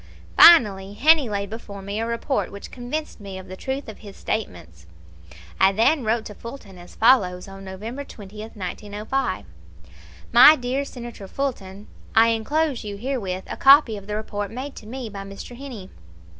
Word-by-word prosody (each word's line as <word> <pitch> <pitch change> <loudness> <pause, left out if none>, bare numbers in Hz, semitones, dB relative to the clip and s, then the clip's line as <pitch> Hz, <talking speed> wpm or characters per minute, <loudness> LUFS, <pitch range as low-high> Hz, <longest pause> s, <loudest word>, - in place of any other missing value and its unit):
Finally 205 - +6
Heney 305 -3 +5
laid 200 -1 -3
before 200 -3 -8
me 200 +2 -4
a 225 - -2
report 235 +4 -2
which 200 - -10
convinced 260 +5 -5
me 195 -2 -8
of 190 - -10
the 185 - -8
truth 265 +7 -4
of 220 - -9
his 200 -2 -12
statements. 85 - -5 0.7
I 190 0 +6
then 240 +7 +3
wrote 220 0 0
to 210 - -8
Fulton 210 -5 -11
as 175 - -14
follows, 195 -7 +3
on 195 0 -11
November 215 +8 -7
20, 205 -6 -12
1905: 210 - -4 0.9
"My 250 +6 +9
dear 260 +1 -2
Senator 240 -6 -9
Fulton: 205 -6 -4 0.3
I 225 +1 +6
inclose 275 +5 0
you 205 -1 -6
herewith 200 -6 -3
a - - -6
copy 275 -4 +6
of 200 -1 -10
the 210 - -3
report 205 -1 -4
made 260 +6 -7
to 215 - -10
me 255 +1 -6
by 200 -2 -7
Mr. 195 +5 -9
Heney. 240 -8 -9
220 Hz, 170 wpm, -23 LUFS, 195-255 Hz, 0.9 s, My